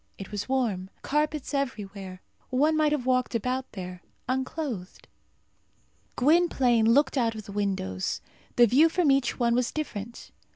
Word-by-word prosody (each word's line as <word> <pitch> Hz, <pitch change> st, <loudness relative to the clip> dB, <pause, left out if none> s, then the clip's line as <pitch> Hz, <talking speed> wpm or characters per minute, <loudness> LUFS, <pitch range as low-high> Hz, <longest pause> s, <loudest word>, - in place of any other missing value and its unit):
It 195 Hz, -, -9 dB
was 205 Hz, +2 st, -4 dB
warm. 220 Hz, -9 st, 0 dB
Carpets 300 Hz, 0 st, -1 dB
everywhere. 200 Hz, -9 st, -4 dB, 0.3 s
One 295 Hz, +5 st, +2 dB
might 305 Hz, -1 st, +3 dB
have 290 Hz, -5 st, -1 dB
walked 255 Hz, -1 st, +1 dB
about 255 Hz, +3 st, -2 dB
there, 180 Hz, -2 st, -7 dB, 0.3 s
unclothed. 255 Hz, -, -4 dB, 1.1 s
Gwynplaine 255 Hz, -6 st, +3 dB
looked 275 Hz, +1 st, +3 dB
out 230 Hz, -2 st, +1 dB
of 215 Hz, -2 st, -8 dB
the -, -, -9 dB
windows. 190 Hz, -, -2 dB, 0.4 s
The 240 Hz, -, +7 dB
view 280 Hz, +8 st, +5 dB
from 325 Hz, -3 st, +2 dB
each 270 Hz, -3 st, +1 dB
one 235 Hz, -1 st, +3 dB
was 245 Hz, 0 st, +1 dB
different. 235 Hz, -7 st, -6 dB
250 Hz, 140 wpm, -27 LUFS, 205-280 Hz, 1.1 s, The